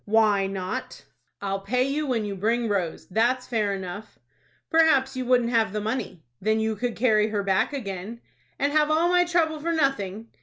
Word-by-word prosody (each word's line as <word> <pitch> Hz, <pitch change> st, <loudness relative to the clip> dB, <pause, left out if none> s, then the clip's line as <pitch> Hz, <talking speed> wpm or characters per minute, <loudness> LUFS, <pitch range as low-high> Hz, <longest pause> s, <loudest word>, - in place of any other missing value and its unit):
"Why 210 Hz, -2 st, +3 dB
not?" 195 Hz, +6 st, -5 dB, 0.4 s
"I'll 195 Hz, 0 st, -1 dB
pay 245 Hz, +6 st, 0 dB
you 285 Hz, +3 st, -1 dB
when 235 Hz, -5 st, 0 dB
you 200 Hz, -1 st, -4 dB
bring 230 Hz, +4 st, 0 dB
Rose. 190 Hz, -6 st, -2 dB
That's 240 Hz, +6 st, +1 dB
fair 220 Hz, -5 st, 0 dB
enough." 190 Hz, +3 st, -8 dB, 0.5 s
"Perhaps 275 Hz, -5 st, +4 dB
you 255 Hz, -1 st, -3 dB
wouldn't 245 Hz, -2 st, +3 dB
have 225 Hz, -4 st, +2 dB
the 210 Hz, -, -1 dB
money." 210 Hz, -6 st, -4 dB, 0.2 s
"Then 220 Hz, +2 st, +1 dB
you 220 Hz, 0 st, 0 dB
could 240 Hz, +2 st, -3 dB
carry 215 Hz, -3 st, +3 dB
her 210 Hz, -2 st, -2 dB
back 195 Hz, +6 st, +1 dB
again." 215 Hz, -4 st, -5 dB, 0.4 s
"And 280 Hz, +1 st, +1 dB
have 305 Hz, -1 st, +3 dB
all 320 Hz, +3 st, +3 dB
my 355 Hz, 0 st, +4 dB
trouble 330 Hz, -3 st, +1 dB
for 335 Hz, +3 st, -2 dB
nothing!" 230 Hz, -, -1 dB
225 Hz, 185 wpm, -25 LUFS, 200-265 Hz, 0.5 s, Perhaps